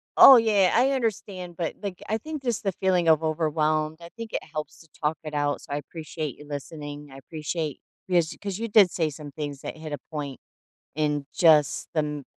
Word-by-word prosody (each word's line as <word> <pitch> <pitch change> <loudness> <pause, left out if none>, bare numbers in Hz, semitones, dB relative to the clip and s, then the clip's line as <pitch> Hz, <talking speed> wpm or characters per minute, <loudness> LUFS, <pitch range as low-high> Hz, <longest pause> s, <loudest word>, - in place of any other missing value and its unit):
oh, 270 - +11
yeah, 210 -5 +4
I 255 +4 +4
understand, 200 -8 -3
but 165 -3 -2
like, 195 -3 -5
I 220 +1 0
think 310 0 -6
just 240 -4 -1
the 195 - +1
feeling 180 -2 +1
of 160 -1 +5
overwhelmed, 155 -1 0
I 170 - -11
think 230 -1 -7
it - - -3
helps 155 -1 -6
to 165 - -18 0.2
talk 150 +1 +1
it 155 -1 -7
out, 145 -1 0
so, - - -13
I 145 - 0
appreciate 155 -1 -6
you 150 - -12
listening. 145 0 -7
I 135 - -11
appreciate 155 +1 -4 0.3
because 175 -3 +2
'cause 200 -1 -4
you 230 - -2
did 205 -4 +6
say 160 -3 0
some 145 -1 -9
things 145 -2 -5
that - - -6
hit 155 -1 -8
a 145 - -2
point 145 -4 -5 0.6
in 150 -2 0
just 155 -5 +4
the - - 0
m 150 -2 -4
160 Hz, 210 wpm, -26 LUFS, 150-190 Hz, 0.6 s, oh